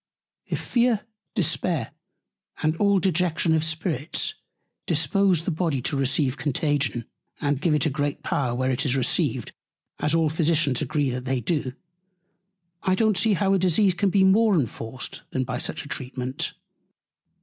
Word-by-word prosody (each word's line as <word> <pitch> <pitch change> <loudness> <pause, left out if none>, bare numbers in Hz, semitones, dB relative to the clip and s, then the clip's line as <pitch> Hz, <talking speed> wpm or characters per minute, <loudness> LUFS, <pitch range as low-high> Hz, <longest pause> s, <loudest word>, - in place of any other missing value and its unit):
If - - -2
Fear, 240 -3 +2 0.3
Despair, 165 - 0 0.7
and 155 +1 +2
all 200 0 +3
Dejection 175 -2 +1
of 160 -1 +2
Spirits 160 -2 -1 0.5
dispose 195 -5 +2
the 180 - -1
Body 160 -4 0
to 145 - -1
receive 135 0 +1
Contagion, 140 -5 0 0.3
and 145 -2 0
give 160 -2 +2
it 150 - +1
a 155 - +1
great 145 0 -2
Power, 125 -4 0
where 130 +1 0
it 130 +1 0
is 135 -3 +1
received, 130 - 0 0.5
as 150 +2 +1
all 165 -1 +3
Physicians 155 -4 +1
agree 145 -4 0
they 125 +1 -2
do, 130 0 -1 1.1
I 185 -1 +2
don't 220 0 +2
see 220 +3 +3
how 195 +1 +2
a 195 - +3
Disease 185 +2 +3
can 190 +3 +1
be 195 +1 +3
more 205 +2 +5
enforced, 120 -4 -3
than 130 - -1
by 125 -1 -3
such 160 +2 -4
a - - -9
Treatment. 130 -1 -4
155 Hz, 155 wpm, -25 LUFS, 135-185 Hz, 1.1 s, more